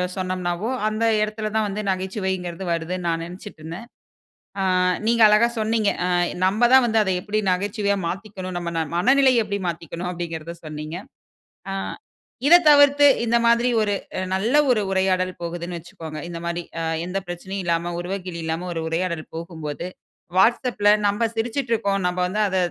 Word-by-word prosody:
சொன்னோம்னாவோ, 185 +1 -2 0.2
அந்த 215 +1 -1 0.2
இடத்துல 215 0 -2
தான் 220 -1 +2
வந்து 205 +1 -3
நகைச்சுவைங்கிறது 190 -2 -3
வருதுன்னு 175 +2 -3
நான் 165 0 -1
நினைச்சிட்டு 180 +1 -10
இருந்தேன். 170 +9 -8 0.7
அ - - +1 0.4
நீங்க 230 0 +3
அழகா 215 +3 +5
சொன்னீங்க. 215 -1 +1 0.2
அ - - 0 0.4
நம்ம 215 +5 +3
தான் 260 -2 +7
வந்து 225 -1 +2
அத 190 - -1
எப்படி 215 +1 -2
நகைச்சுவையா 200 +2 0
மாத்திக்கணும் 190 -1 -6
நம்ம 170 -1 -4
ந - - +1 0.2
மனநிலைய 260 +3 +4
எப்படி 200 -1 -3
மாத்திக்கணும் 170 +1 -5
அப்படிங்கிறத 170 -1 -5
சொன்னீங்க. 155 +2 -6 0.8
ஆ - - -2 0.7
இத 340 - +9
தவிர்த்து 285 0 +6 0.2
இந்த 235 +1 +3
மாரி 235 +1 +4
ஒரு 205 -1 +1 0.4
நல்ல 225 +8 0 0.2
ஒரு 215 - +2
உரையாடல் 185 -1 +1
போகுதுன்னு 170 +1 -4
வச்சுக்கோங்க. 160 -2 -9
இந்த 170 - -6
மாரி 170 0 -2 0.2
அ - - -2 0.2
எந்த 180 +2 -3
பிரச்சனையும் 185 +2 -5
இல்லாம 170 0 0
உருவக்கேலி 180 -1 -5
இல்லாம 165 +3 -3
ஒரு 165 - -2
உரையாடல் 170 -1 -2
போகும்போது 165 -1 -6 0.5
WhatsAppல 230 0 +3 0.2
நாம 205 +3 +2
சிரிச்சுட்டு 235 +2 -2
இருக்கோம். 200 -3 0
நம்ம 180 - -2
வந்து 200 +4 -3
அத 190 -1 -1
190 Hz, 155 wpm, -23 LUFS, 175-215 Hz, 0.8 s, இத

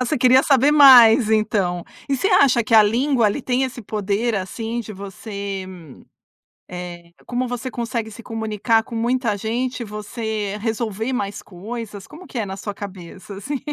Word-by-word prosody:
Você 255 - 0
queria 255 +1 +5
saber 275 0 +4
mais 255 -5 +8
então. 200 -5 0 0.2
E 275 - +1
você 385 - 0
acha 275 - +4
que 220 - -5
a 220 - +9
língua 240 +3 +2
ali 210 +7 -1
tem 255 +1 0
esse 255 -2 -6
poder, 210 +2 -1
assim, 225 +5 -4
de 220 -2 -8
você, 200 0 -6 1.0
eh, 175 -1 -8
como 250 +1 -2
você 245 +1 -4
consegue 235 -2 -4
se 220 +2 -11
comunicar 225 0 0
com 235 - -10
muita 235 -1 0
gente, 240 +3 -3
você 210 -1 -4
resolver 225 +1 -2
mais 205 -4 -3
coisas? 205 +2 -8
Como 330 +5 -13
que 255 - -6
é 220 - -1
na 190 0 -6
sua 205 0 -5
cabeça, 195 0 -9
assim, 270 +9 -4
225 Hz, 165 wpm, -21 LUFS, 200-245 Hz, 1.0 s, a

